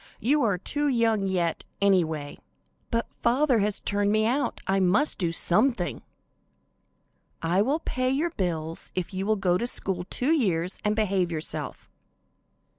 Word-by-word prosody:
You 290 +7 +2
are 205 -7 +2
too 290 +10 -1
young 225 -6 +2
yet, 175 -3 -1 0.2
anyway." 160 -7 +1 0.5
"But 230 -1 0 0.2
father 250 +1 +3
has 205 0 0
turned 205 0 0
me 215 0 +2
out, 250 +2 0
I 195 0 +1
must 195 +11 +2
do 170 -3 +1
something." 180 +4 +1 1.4
"I 175 +4 +2
will 280 +9 +1
pay 255 -4 -1
your 300 +6 0
bills 165 - -2
if 185 +1 -3
you 190 +1 -3
will 215 - +3
go 180 -3 +1
to 240 - -1
school 185 -6 -3
two 260 +5 0
years 185 - +1
and 210 0 +1
behave 195 -5 +1
yourself." 155 -3 -4
200 Hz, 150 wpm, -26 LUFS, 180-240 Hz, 1.4 s, father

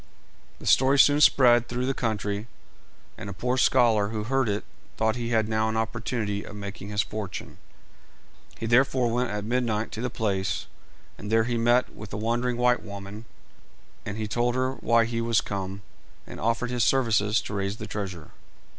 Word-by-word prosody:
The - - -12
story 135 +2 +4
soon 145 +1 +5
spread 120 -5 +5
through 125 +1 -2
the 135 - 0
country, 105 -3 -2 0.7
and 105 -2 -6
a - - -5
poor 125 +6 -1
scholar 120 -5 +3
who 105 0 -3
heard 130 0 +1
it 100 0 -1 0.3
thought 110 0 +1
he 120 -1 -3
had 110 -2 +2
now 110 0 +1
an 110 - -2
opportunity 110 -2 -2
of - - -10
making 100 0 -7
his 105 0 +1
fortune. 105 -3 -7 1.0
He - - -4
therefore 125 0 +3
went 125 +1 0
at 105 0 -3
midnight 115 -2 -1
to 110 - -5
the 125 - -1
place, 100 -5 -2 0.5
and 105 - -6
there 115 0 +4
he 120 +1 -1
met 120 +2 +2
with 105 -1 -9
the 100 - -5
wandering 120 +3 -1
white 125 0 +3
woman, 100 +2 -9 0.8
and 105 0 -5
he 110 -1 -3
told 120 +3 0
her 130 0 0
why 115 -3 +2
he 115 0 -2
was 115 -1 +2
come, 100 0 -5 0.4
and - - -9
offered 115 +3 0
his 120 -2 +1
services 110 -5 +2
to - - -7
raise 100 0 -2
the - - -6
treasure. 95 -6 -6
115 Hz, 180 wpm, -26 LUFS, 105-120 Hz, 1.0 s, soon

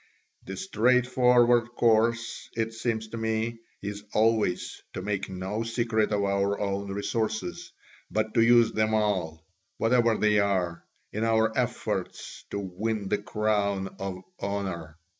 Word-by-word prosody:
The 95 - -6
straightforward 120 +2 +3
course, 115 0 +2
it 115 0 -1
seems 110 -1 -2
to 115 - -6
me, 110 +1 -1 0.2
is 100 0 -5
always 110 -4 +1
to - - -5
make 100 -2 -2
no 95 +4 -3
secret 115 -2 0
of 100 -1 +1
our 100 0 +1
own 100 -1 -2
resources, 100 -3 -2 0.4
but 110 0 -1
to 115 - +4
use 120 0 +6
them 110 0 +1
all, 90 -7 -1 0.3
whatever 115 -1 +3
they 105 -1 +3
are, 95 -4 0 0.3
in 110 - -1
our 110 -1 +2
efforts - - -3
to - - -4
win 100 +2 -3
the - - +1
crown 100 -2 -1
of 95 -1 -5 0.2
honour. 95 -6 -4
110 Hz, 135 wpm, -27 LUFS, 100-115 Hz, 0.4 s, use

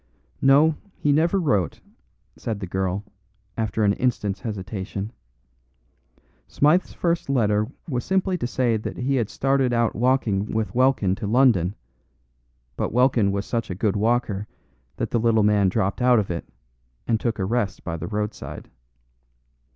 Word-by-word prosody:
"No, 145 +3 +5 0.2
he 145 - +1
never 165 +6 +3
wrote," 105 - 0 0.6
said 110 -3 -4
the 100 - -4
girl, 95 +2 -2 0.5
after 110 -1 -1
an 100 -1 +4
instant's 105 -5 -1
hesitation. 100 -1 -5 1.4
"Smythe's 155 +6 +2
first 170 -4 -1
letter 105 -5 +2 0.2
was 125 -6 -2
simply 190 0 +1
to 120 - -1
say 120 -2 +1
that 105 - -6
he 135 +2 0
had 115 -4 0
started 135 -2 +1
out 115 -1 +1
walking 115 -5 +1
with 110 -1 -2
Welkin 125 -7 +3
to 110 - -4
London; 110 -6 +3 1.0
but - - -2
Welkin 120 -4 +3
was 100 0 -2
such 115 -1 -2
a 90 - -3
good 105 +2 0
walker 105 -2 0 0.5
that - - -3
the 120 - +2
little 110 -1 +3
man 105 -2 +3
dropped 95 +5 -1
out 125 -1 +5
of 100 -4 0
it, 85 - -5 0.6
and 115 -2 +2
took 115 -2 -1
a 95 - -1
rest 105 -2 -1
by 85 - -4
the 85 +1 -5
roadside. 105 0 -5
110 Hz, 150 wpm, -24 LUFS, 100-130 Hz, 1.4 s, No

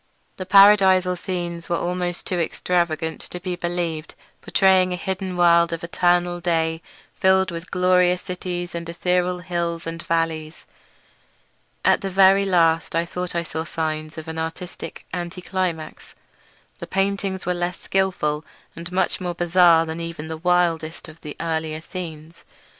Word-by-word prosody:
The 185 - -6
paradisal 190 -2 +6
scenes 175 -2 -4
were 170 - +1
almost 175 0 -2
too 180 - -1
extravagant 165 -1 -1
to 180 - -8
be 180 0 -3
believed; 175 -3 -3 0.3
portraying 190 -1 +3
a - - 0
hidden 185 0 -4
world 170 -1 +5
of 165 0 -4
eternal 175 0 +1
day 165 -2 0 0.3
filled 190 0 +3
with 170 +1 -7
glorious 180 0 +3
cities 180 -1 -4
and 170 0 -5
ethereal 180 +1 0
hills 170 -2 -2
and 165 +1 -5
valleys. 165 -2 -2 1.2
At - - +4
the 195 - -3
very 195 +1 +5
last 165 -4 +2
I 165 +1 +1
thought 180 +1 -5
I 170 - 0
saw 160 -1 -4
signs 155 -1 -4
of 160 0 -7
an 160 0 -5
artistic 165 +2 -6
anti 175 0 -4
climax. 180 -4 -4 0.6
The - - -7
paintings 195 0 -1
were 180 - +1
less 175 0 -3
skilful, 180 -6 0 0.3
and 170 +1 -8
much 185 0 0
more 175 -1 -3
bizarre 175 -1 +5
than 160 +1 -5
even 165 -2 -6
the 160 - -3
wildest 170 -2 0
of 155 +1 -15
the 150 -2 -8
earlier 160 -1 -2
scenes. 165 -1 -8
175 Hz, 150 wpm, -22 LUFS, 165-180 Hz, 1.2 s, paradisal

